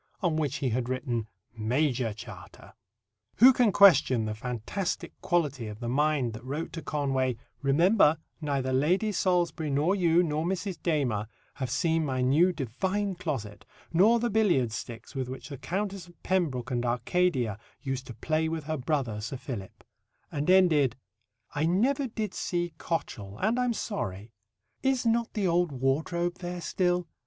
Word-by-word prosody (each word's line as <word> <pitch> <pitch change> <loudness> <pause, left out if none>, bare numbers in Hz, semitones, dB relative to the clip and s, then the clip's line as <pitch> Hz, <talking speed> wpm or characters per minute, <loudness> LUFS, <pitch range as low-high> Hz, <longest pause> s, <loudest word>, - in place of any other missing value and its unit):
on 175 -5 +1
which 150 -3 0
he 135 -5 -1
had 120 +1 -1
written 125 -4 -2 0.3
"Major 120 +1 0
Charta." 105 - -11 0.6
Who 255 +6 +8
can 240 -4 +3
question 170 - +6
the 110 - -2
fantastic 125 - -4
quality 150 - 0
of 105 0 -8
the 120 - -4
mind 140 -2 +1
that 110 +1 -9
wrote 145 +6 -4
to 165 - -5
Conway: 135 -5 0 0.3
"Remember, 160 +4 +4 0.2
neither 135 -3 -1
Lady 180 +11 +2
Salisbury 175 -5 +1
nor 145 +7 +2
you, 175 -2 +4
nor 155 -1 -1
Mrs. 185 +1 -3
Damer, 130 - 0 0.3
have 130 -2 -4
seen 160 +5 +1
my 130 -3 -1
new 155 +8 +4
divine 185 - -2
closet, 115 - -5 0.3
nor 210 +8 +5
the 235 0 0
billiard 180 - +3
sticks 115 +3 -7
with 130 -3 -3
which 130 +3 -7
the 140 - -6
Countess 195 -1 -3
of 175 - -20
Pembroke 145 -9 0
and 120 -1 0
Arcadia 125 - 0 0.2
used 135 -2 -3
to 120 - -8
play 155 +7 0
with 160 -1 -3
her 155 +1 -2
brother, 130 -6 -1
Sir 115 +5 -4
Philip," 115 -7 -7 0.5
and 145 +3 -2
ended: 160 -9 +5 0.6
"I 150 +2 +1
never 260 +10 +2
did 215 -4 -4
see 175 -2 -2
Cotchel, 105 - -4
and 225 +5 +1
am 250 -1 +1
sorry. 105 - -4 0.5
Is 265 -2 +1
not 230 0 +1
the 205 -3 0
old 175 -2 +2
ward 135 +5 0
robe 175 0 -1
there 175 -1 -5
still? 180 -1 0
155 Hz, 160 wpm, -28 LUFS, 130-180 Hz, 0.6 s, Who